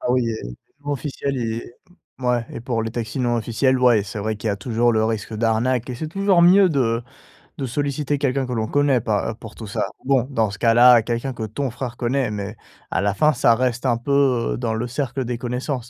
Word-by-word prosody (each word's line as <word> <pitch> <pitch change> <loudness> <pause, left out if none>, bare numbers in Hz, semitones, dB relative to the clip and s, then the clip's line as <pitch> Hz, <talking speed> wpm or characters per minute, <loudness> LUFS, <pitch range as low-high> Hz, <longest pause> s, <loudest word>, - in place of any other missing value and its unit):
Ah - - -1
oui 125 -2 +1
et 110 - -4 0.4
non 145 - -1
officiel 140 0 -3
et 115 0 -4 0.5
mouais. 125 -2 0
Et - - -6
pour 115 -1 -2
les 115 - -3
taxis 115 +2 -4
non 120 -1 +1
officiels, 125 +3 +1
ouais, 120 -5 +4
c'est 100 +1 -7
vrai 110 +1 -2
qu'il 105 +1 -4
y - - +2
a 100 - -1
toujours 115 +3 +1
le 110 0 +2
risque 110 -1 -3
d'arnaque 115 +3 0
et - - -4
c'est 155 +6 -5
toujours 195 0 +3
mieux 185 +2 +7
de 120 -6 0 0.6
de 135 - -2
solliciter 145 +2 -1
quelqu'un 135 -1 0
que 125 - -5
l'on 110 -2 -1
connaît, 145 -3 +2
pas 110 -1 -1
heu, - - -9
pour 110 -1 -12
tout 110 - -8
ça. 110 +1 -2 0.2
Bon, 130 -1 +2
dans 115 -5 +1
ce 100 - -8
cas 115 -1 +3
là, 120 -1 +7
quelqu'un 120 +4 -2
que 115 - -7
ton 125 +5 -3
frère 120 0 -6
connaît 125 -1 0
mais 105 +1 -5 0.3
à - - 0
la 100 -1 +1
fin, 155 +4 +3
ça 120 -3 +4
reste 125 0 -1
un 120 -3 +2
peu, 130 -1 +1
heu, - - -3
dans 115 -2 -2
le 115 +2 -2
cercle 130 +1 -3
des 120 0 -3
connaissances. 125 +3 -2
120 Hz, 240 wpm, -22 LUFS, 115-135 Hz, 0.6 s, mieux